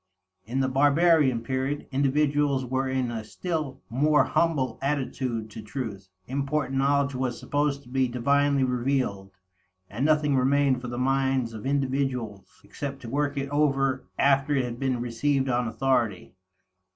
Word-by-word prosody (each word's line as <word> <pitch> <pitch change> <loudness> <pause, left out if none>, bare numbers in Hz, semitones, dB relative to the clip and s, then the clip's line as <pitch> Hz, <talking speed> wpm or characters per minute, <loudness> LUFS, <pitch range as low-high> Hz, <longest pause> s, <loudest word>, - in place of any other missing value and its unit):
In 125 +5 -1
the 130 - +1
barbarian 145 -1 +3
period, 130 +4 -2
individuals 140 0 +1
were 130 +1 -1
in 130 -2 -1
a 115 -2 -4
still 155 +3 -4
more 150 +6 +3
humble 155 -6 0
attitude 130 -5 -2
to 110 - -8
truth; 105 -4 -6 0.2
important 135 0 -1
knowledge 140 0 +2
was 125 -2 -2
supposed 145 -1 -1
to - - -19
be 130 0 +1
divinely 140 +3 +2
revealed, 125 -6 -1 0.6
and 115 +6 -3
nothing 150 -2 +3
remained 135 0 +2
for 125 - -6
the 120 0 -5
minds 130 -2 +1
of 110 +3 -6
individuals 130 -6 -2
except 135 +7 -6
to 115 - -7
work 145 +1 -1
it 140 0 -2
over 135 -3 +1
after 140 +1 +3
it 130 -2 +1
had 120 0 -6
been 130 -2 0
received 135 +3 0
on 125 -1 0
authority. 115 -7 0
135 Hz, 150 wpm, -26 LUFS, 125-140 Hz, 0.6 s, barbarian